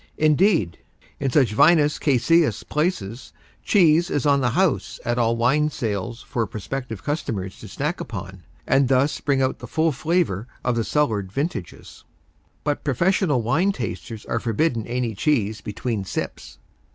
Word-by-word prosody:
Indeed, 155 - +2 0.4
in 135 - 0
such 125 -5 +3
vinous 150 +4 +4
caseous 155 +4 +2
places 135 - -2 0.3
cheese 170 -3 +4
is 145 - -1
on 140 -1 +4
the 120 - +2
house 170 +4 0
at 120 +1 0
all 115 0 +2
wine 140 +6 +2
sales 115 -3 -4
for 115 -3 -2
prospective 115 0 -6
customers 105 - -3
to - - -10
snack - - -3
upon 95 0 -7 0.2
and 135 0 +3
thus 135 +3 +2
bring 140 -2 +1
out 130 - -1
the - - -8
full 160 0 +1
flavor 145 - 0 0.2
of 125 -1 +1
the 115 - 0
cellared 110 -10 0
vintages. 135 - -5 0.6
But 145 -1 -1
professional 150 - +1
wine 175 - +2
tasters 115 - -6
are 115 - -1
forbidden 115 +1 0
any 120 -1 -2
cheese 110 -2 0
between 110 0 -3
sips. 95 - -5
130 Hz, 150 wpm, -23 LUFS, 115-150 Hz, 0.6 s, vinous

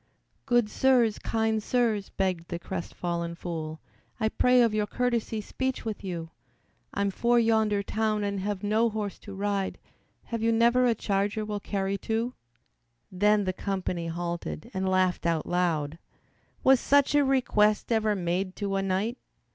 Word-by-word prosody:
"Good 240 -3 +3
Sirs, 240 -2 +3
Kind 220 -1 0
Sirs," 220 -4 0
begged 185 -3 -1
the 170 - -4
crestfallen 170 -1 -4
fool, 160 -2 -5 0.4
"I 220 -1 +2
pray 250 +2 +4
of 230 -2 +2
your 210 -1 0
courtesy 235 -2 -1
speech 260 +5 -3
with 215 -2 -4
you, 170 -4 -5 0.6
I'm 200 0 0
for 240 +4 +2
yonder 220 -3 +3
town, 215 0 0
and 200 -1 -1
have 200 0 -3
no 220 +3 +2
horse 210 -2 -4
to 200 - -10
ride, 200 -1 -1 0.5
Have 230 -1 -4
you 230 +1 +3
never 235 +2 +4
a 235 - +3
charger 205 +1 -1
will 210 -1 -3
carry 195 -1 -2
two?" 230 +3 -1 0.8
Then 205 +2 +3
the 185 -1 -1
company 185 -3 -3
halted 170 - -4
and 190 0 -1
laughed 185 -2 +1
out 165 -2 0
loud. 165 -3 0 0.6
"Was 265 -1 +6
such 285 +2 +3
a 290 0 +5
request 240 -6 +2
ever 220 -2 +2
made 185 +1 -2
to 200 -2 -2
a - - +1
knight?" 195 +6 -1
205 Hz, 155 wpm, -28 LUFS, 185-225 Hz, 0.8 s, Was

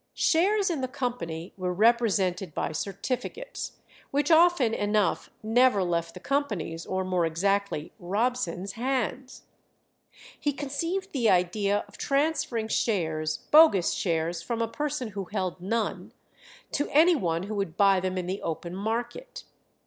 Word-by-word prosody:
Shares 390 +4 +3
in 310 -5 -2
the 255 - -1
company 185 -11 -4
were 180 -1 -2
represented 195 -5 +2
by - - -1
certificates, 250 - -4 0.4
which 290 +3 0
often 320 -8 +5
enough 205 -3 0
never 225 -2 +4
left 170 -1 -2
the - - -7
company's, 200 - -2
or 190 0 -1
more 185 -2 0
exactly 185 0 0
Robson's, 200 -1 -1
hands. 255 +2 -3 1.0
He 290 - 0
conceived 330 +8 -3
the 240 -6 +2
idea 200 +3 +2
of - - -16
transferring 275 -6 0
shares, 160 -9 -1
bogus 300 - +6
shares 165 -1 -1
from 230 +6 -3
a 230 - +1
person 290 -1 -3
who 200 -2 -5
held 185 -4 -3
none, 225 +4 -2 0.6
to 290 - -1
any 330 +4 +5
one 170 - -1
who 205 +3 -5
would 195 -5 -3
buy 195 -2 +5
them 185 0 -2
in 180 - -2
the 190 +3 -3
open 170 +2 -4
market. 235 - -4
210 Hz, 140 wpm, -27 LUFS, 180-265 Hz, 1.0 s, bogus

